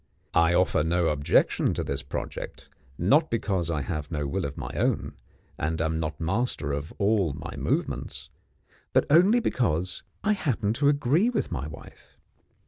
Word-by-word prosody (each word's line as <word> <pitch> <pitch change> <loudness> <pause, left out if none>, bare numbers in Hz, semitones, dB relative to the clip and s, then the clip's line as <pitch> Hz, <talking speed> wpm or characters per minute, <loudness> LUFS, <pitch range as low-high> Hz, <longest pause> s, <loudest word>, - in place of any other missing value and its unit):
I 85 +1 +4
offer 90 -4 +3
no 85 +1 +2
objection 70 -1 +2
to - - -1
this - - -3
project - - -6 0.3
not 145 - +3
because 95 -7 -1
I 80 -3 0
have 75 +2 -4
no 75 -4 -2
will 95 +6 -2
of 70 0 -5
my - - -5
own, - - 0 0.5
and 80 +2 -1
am 80 0 0
not 80 -1 -3
master 95 - -1
of 70 +2 -3
all 100 -6 +2
my - - -7
movements - - -2 0.6
but - - +4
only 185 +10 +6
because 90 - 0 0.2
I 215 - +2
happen 130 - 0
to 140 +4 +3
agree 145 - +3
with 245 - -2
my 70 +2 -3
wife. 75 - -13
90 Hz, 160 wpm, -27 LUFS, 80-125 Hz, 0.6 s, only